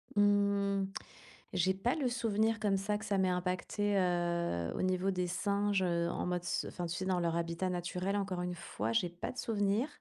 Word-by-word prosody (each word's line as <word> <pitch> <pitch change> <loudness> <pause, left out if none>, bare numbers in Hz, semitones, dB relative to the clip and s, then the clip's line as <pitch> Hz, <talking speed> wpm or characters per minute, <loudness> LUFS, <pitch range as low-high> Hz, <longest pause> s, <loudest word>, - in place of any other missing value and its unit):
Mmh. 200 -1 +3 0.7
J'ai 185 +1 +3
pas 235 +9 0
le 280 -5 0
souvenir 225 -1 +1
comme 200 -2 +2
ça 205 +2 0
que 220 - -7
ça 200 -1 +1
m'ait 190 -1 +3
impacté, 185 +3 0
heu, 170 - +1
au - - -1
niveau 185 +1 +1
des 180 -1 0
singes, 200 +2 +1
heu, 170 -2 +1
en - - -2
mode 180 -1 -1
ce 175 - -1
enfin 175 - -4
tu 170 +1 -3
sais 185 - -3
dans 185 -1 +1
leur 170 -1 0
habitat 170 +2 -1
naturel 180 +2 -2
encore 195 -3 -1
une 180 0 -2
fois - - -3
j'ai 215 -7 +2
pas 175 +1 -5
de 255 - -14
souvenir. 210 +3 +1
190 Hz, 205 wpm, -33 LUFS, 180-205 Hz, 0.7 s, Mmh